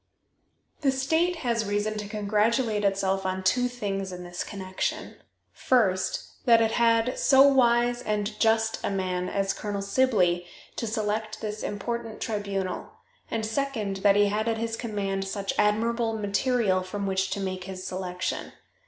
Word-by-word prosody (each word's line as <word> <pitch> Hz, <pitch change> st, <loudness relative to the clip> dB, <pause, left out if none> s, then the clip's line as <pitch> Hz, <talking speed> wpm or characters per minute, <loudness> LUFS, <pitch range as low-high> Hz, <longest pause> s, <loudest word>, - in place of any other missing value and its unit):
The 280 Hz, -, +2 dB
state 320 Hz, +7 st, +1 dB
has 230 Hz, -2 st, +1 dB
reason 205 Hz, +1 st, -1 dB
to 210 Hz, -, -5 dB
congratulate 215 Hz, +2 st, +1 dB
itself 195 Hz, -1 st, +1 dB
on 190 Hz, 0 st, -2 dB
two 245 Hz, +7 st, +3 dB
things 195 Hz, -6 st, -3 dB
in 180 Hz, 0 st, -7 dB
this 175 Hz, 0 st, -5 dB
connection. 190 Hz, -2 st, -4 dB, 0.4 s
First, 195 Hz, -8 st, 0 dB
that 230 Hz, -2 st, +6 dB
it 225 Hz, -1 st, +2 dB
had 230 Hz, +1 st, +2 dB
so 270 Hz, -1 st, +6 dB
wise 240 Hz, -3 st, +4 dB
and 210 Hz, -1 st, -2 dB
just 225 Hz, 0 st, +2 dB
a -, -, 0 dB
man 185 Hz, -2 st, -1 dB
as 195 Hz, -1 st, 0 dB
Colonel 205 Hz, -1 st, -4 dB
Sibley 200 Hz, -6 st, +2 dB, 0.3 s
to 230 Hz, -, -3 dB
select 215 Hz, 0 st, -2 dB
this 215 Hz, -1 st, -4 dB
important 225 Hz, +2 st, -4 dB
tribunal, 200 Hz, -4 st, -3 dB, 0.4 s
and, 225 Hz, -1 st, -2 dB
second, 220 Hz, -4 st, -2 dB
that 200 Hz, +1 st, +4 dB
he 205 Hz, 0 st, +5 dB
had 215 Hz, +2 st, -1 dB
at 225 Hz, -1 st, +1 dB
his 225 Hz, 0 st, -2 dB
command 200 Hz, -4 st, -3 dB
such 195 Hz, 0 st, -3 dB
admirable 225 Hz, +2 st, +1 dB
material 205 Hz, -1 st, +1 dB
from 200 Hz, +2 st, -4 dB
which 190 Hz, 0 st, 0 dB
to -, -, -3 dB
make 185 Hz, -1 st, -3 dB
his 185 Hz, -1 st, -7 dB
selection. 185 Hz, -1 st, -4 dB
210 Hz, 155 wpm, -27 LUFS, 195-230 Hz, 0.4 s, that